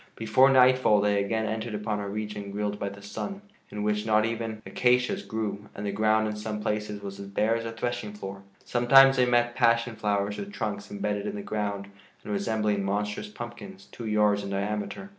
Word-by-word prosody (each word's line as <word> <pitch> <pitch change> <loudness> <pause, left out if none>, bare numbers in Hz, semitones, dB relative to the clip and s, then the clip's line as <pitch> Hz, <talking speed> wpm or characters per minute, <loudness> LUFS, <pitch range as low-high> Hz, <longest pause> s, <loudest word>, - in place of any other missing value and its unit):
Before 115 +5 +4
nightfall 130 -4 +5
they 100 -1 +2
again 110 +2 -1
entered 110 +1 -3
upon 105 0 -2
a 100 -1 -4
region 105 -1 -5
grilled 105 0 -3
by 100 - -2
the 100 +1 -12
sun, 195 - -6 0.3
in 105 0 -4
which 105 0 0
not 110 0 +3
even 115 -1 -4
acacias 125 0 +2
grew, 105 -2 -4
and 100 - -5
the 100 - -1
ground 110 +1 +2
in 105 - -3
some 105 0 -4
places 105 -1 -3
was 100 0 -7
as 100 - -7
bare 105 +3 +1
as 115 0 -3
a 115 - -3
threshing 115 -2 -3
floor. 95 -1 -7 0.2
Sometimes 135 +2 +6
they 125 -1 +4
met 120 0 +2
passion 115 -1 +2
flowers 105 -1 -1
with 200 0 -6
trunks 105 - -4
imbedded 105 0 -2
in - - -3
the 100 - -5
ground 100 -2 -3 0.4
and 105 - -4
resembling 105 0 0
monstrous 105 - -2
pumpkins 190 - -9
two 115 - -7
yards 105 -1 +3
in 100 - -6
diameter. 105 - -3
105 Hz, 200 wpm, -27 LUFS, 105-115 Hz, 0.4 s, Sometimes